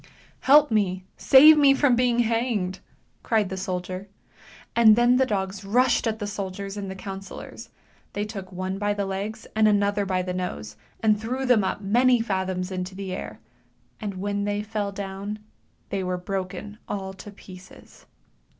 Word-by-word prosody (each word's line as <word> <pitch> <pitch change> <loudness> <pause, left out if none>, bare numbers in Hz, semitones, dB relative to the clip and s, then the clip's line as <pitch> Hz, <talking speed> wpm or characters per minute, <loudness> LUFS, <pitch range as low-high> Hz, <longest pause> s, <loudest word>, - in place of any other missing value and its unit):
" - - -31
Help 295 -1 +7
me! 190 -4 0
Save 300 +3 +7
me 275 -2 +6
from 270 -3 +3
being 240 -1 +2
hanged! 225 -5 -1 0.2
" - - -41
cried 215 -4 +1
the 190 - -4
soldier. 185 0 -4 0.7
And 220 -2 +7
then 240 +2 +4
the 260 0 +3
dogs 195 -2 -3
rushed 245 +4 +2
at 220 -1 -1
the 210 - -4
soldiers 200 -1 -5
and 200 -2 -5
the 190 - -6
councillors; 195 0 -8 0.4
they 205 +1 -2
took 195 -3 -8
one 185 +1 -4
by 205 0 0
the 200 -1 -2
legs, 200 +3 -5
and 215 0 +4
another 205 0 +2
by 185 -1 0
the 180 0 -4
nose, 180 -12 -5 0.3
and 215 -1 +3
threw 255 +4 -3
them 245 -5 +4
up 190 - -2
many 245 +5 +3
fathoms 190 -4 -2
into 185 0 -4
the 190 -1 -5
air; - - -7 0.6
and 205 -3 -5
when 200 +2 -2
they 205 0 -1
fell 210 -1 -3
down, 200 +1 -5 0.5
they 195 -1 -2
were 180 0 -2
broken 195 +3 -5
all 190 -1 -4
to 190 +2 -11
pieces. 190 -2 -15
200 Hz, 175 wpm, -25 LUFS, 190-220 Hz, 0.7 s, Help